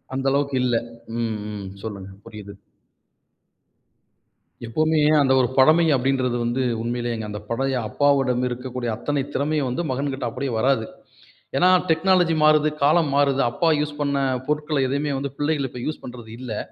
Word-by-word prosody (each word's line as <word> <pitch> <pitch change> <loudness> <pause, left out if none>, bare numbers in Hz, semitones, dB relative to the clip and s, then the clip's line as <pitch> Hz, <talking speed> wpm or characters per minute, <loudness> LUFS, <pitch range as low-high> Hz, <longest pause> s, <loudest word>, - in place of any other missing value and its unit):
அந்த 135 - -3
அளவுக்கு 140 -1 0
இல்ல. 125 -2 +1 0.5
ம், 110 -2 -2
ம். 100 -2 -6 0.2
சொல்லுங்க 100 -3 -7
புரியுது. 100 -1 -10 2.1
எப்பவுமே 155 +6 +1 0.2
அந்த 130 -1 +3
ஒரு 125 - +3
பழமை 155 +6 +6
அப்படின்றது 130 -1 0
வந்து, 120 +3 -1 0.2
உண்மையிலேயேங்க 120 -1 -3
அந்த 105 - -5
பழைய 135 +3 -1
அப்பாவோட 140 0 +2 0.2
இருக்கக்கூடிய 125 0 -4
அத்தனை 145 +4 -2
திறமையும் 145 +1 -1
மகன்கிட்ட 135 0 -3
அப்படியே 135 +2 -4
வராது. 125 -1 +2 0.7
ஏன்னா 180 +6 +4 0.2
டெக்னாலஜி 175 0 +3
மாறுது, 155 0 +5
காலம் 155 0 +3
மாறுது. 140 -1 +3
அப்பா 165 +6 +1
யூஸ் 150 0 -3
பண்ண 140 -1 0 0.3
பொருட்களை 150 -1 0
எதுவுமே 140 +2 -1
வந்து 140 -1 -4
பிள்ளைகள் 145 -2 0
இப்ப 125 - -8
யூஸ் 155 - -4
பண்றது 120 -3 -9
இல்லை. 120 -5 -5
135 Hz, 140 wpm, -23 LUFS, 120-150 Hz, 2.1 s, பழமை